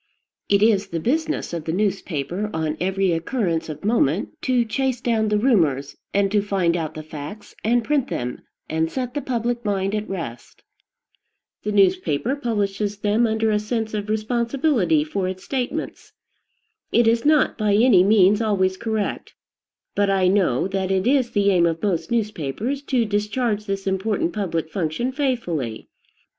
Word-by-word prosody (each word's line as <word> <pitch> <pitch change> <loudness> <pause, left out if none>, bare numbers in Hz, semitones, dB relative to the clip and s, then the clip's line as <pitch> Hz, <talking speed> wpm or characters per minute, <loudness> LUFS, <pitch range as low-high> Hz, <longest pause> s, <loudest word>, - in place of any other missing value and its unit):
It 200 0 +4
is 210 -3 +3
the 170 -3 -3
business 310 - -1
of 165 -2 -4
the 160 - -1
newspaper, 190 -1 -2
on 160 -1 -1
every 190 0 +1
occurrence 170 -1 -1
of 155 +4 -7
moment, 205 - +2
to 250 -2 +2
chase 255 +2 -1
down 225 -3 +1
the 210 0 +2
rumors, 165 - +2 0.2
and 200 -1 +1
to 205 -1 +3
find 190 -4 +1
out 160 -3 -3
the 155 - -6
facts 155 +6 -9
and 235 +2 +2
print 280 +1 +1
them, 125 0 -4 0.3
and 160 +1 -1
set 250 -2 -3
the 290 - -2
public 240 -2 -2
mind 195 -2 -1
at 215 0 -2
rest. 125 -11 -7 1.0
The 210 - -2
newspaper 190 - +2
publishes 205 -5 -2
them 210 +3 +2
under 220 0 +1
a 210 - +2
sense 220 0 -3
of 210 0 -3
responsibility 230 - +1
for 185 +5 -2
its 185 0 -5
statements. 255 -2 -4 0.8
It 235 0 +4
is 230 +1 +3
not 300 -1 +3
by 210 -2 +1
any 215 -4 +6
means 205 +1 +5
always 190 -4 +1
correct; 220 -2 -3 0.6
but 205 -1 +1
I 190 -2 +3
know 185 -7 +2
that 190 -1 -2
it 190 -1 +1
is 260 -1 +3
the 200 -2 +2
aim 175 -2 +4
of 165 -1 -3
most 195 -1 0
newspapers 220 - -2
to 250 -5 +1
discharge 210 +1 -1
this 195 0 -3
important 190 -1 0
public 165 -6 -2
function 185 +9 -1
faithfully. 225 - -2
205 Hz, 160 wpm, -22 LUFS, 180-230 Hz, 1.0 s, any